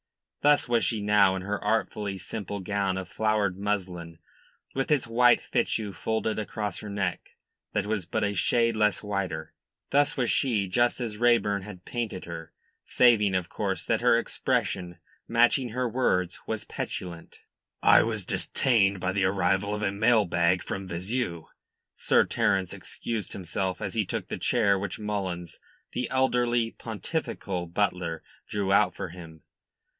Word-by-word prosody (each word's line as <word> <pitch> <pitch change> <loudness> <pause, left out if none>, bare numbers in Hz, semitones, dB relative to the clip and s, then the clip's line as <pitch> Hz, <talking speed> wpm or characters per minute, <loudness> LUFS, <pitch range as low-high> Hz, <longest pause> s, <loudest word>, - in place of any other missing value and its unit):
Thus 145 -2 +4
was 120 -1 +2
she 110 - +1
now 100 -2 +4
in 95 - -4
her 100 +1 -3
artfully 105 -1 -1
simple 100 +2 -5
gown 100 -1 -1
of 95 -2 -5
flowered 105 -2 0
muslin 90 -5 -3 0.6
with 135 0 -1
its 145 -5 +2
white 120 +1 +5
fichu 105 -3 -1
folded 110 0 -1
across 105 -1 -3
her 105 - -7
neck 100 -1 -3 0.4
that 105 - 0
was 105 -5 -2
but 110 +3 -1
a 100 0 +1
shade 115 +4 +2
less 105 -1 +2
white; 100 -2 -1 0.6
thus 145 +1 +3
was 125 -3 +1
she, 110 -7 +1
just 120 +7 +2
as 110 -4 -4
Raeburn 115 -4 +3
had 95 -2 -10
painted 115 -6 -4
her, 85 -1 -8 0.3
saving, 105 -6 +4
of 90 -2 -1
course, - - -2
that - - 0
her - - +5
expression, 90 -2 -1 0.3
matching 120 +2 +3
her 125 +2 -1
words, 95 -7 0
was 110 -1 -3
petulant. 85 -2 -6 0.4
"I - - +8
was 110 -4 -2
detained 100 -6 +2
by 95 +1 -1
the 100 0 +1
arrival 95 +2 +1
of 105 - -4
a 100 - +1
mail 105 +2 +3
bag 85 +1 +2
from 95 -1 -5
Vizeu," 90 0 -3 0.5
Sir - - +3
Terence 95 -2 +1
excused 110 -5 -5
himself, 95 +1 -3
as - - -4
he 110 -4 0
took - - -4
the - - -4
chair 100 -5 +3
which 100 -1 -4
Mullins, 95 -5 -4 0.3
the 125 -1 -2
elderly, 120 -3 +2
pontifical 105 - -4
butler, 85 -3 -1 0.3
drew 100 -2 0
out 100 -2 +4
for - - -5
him. 80 -3 -12
100 Hz, 155 wpm, -27 LUFS, 95-115 Hz, 0.6 s, I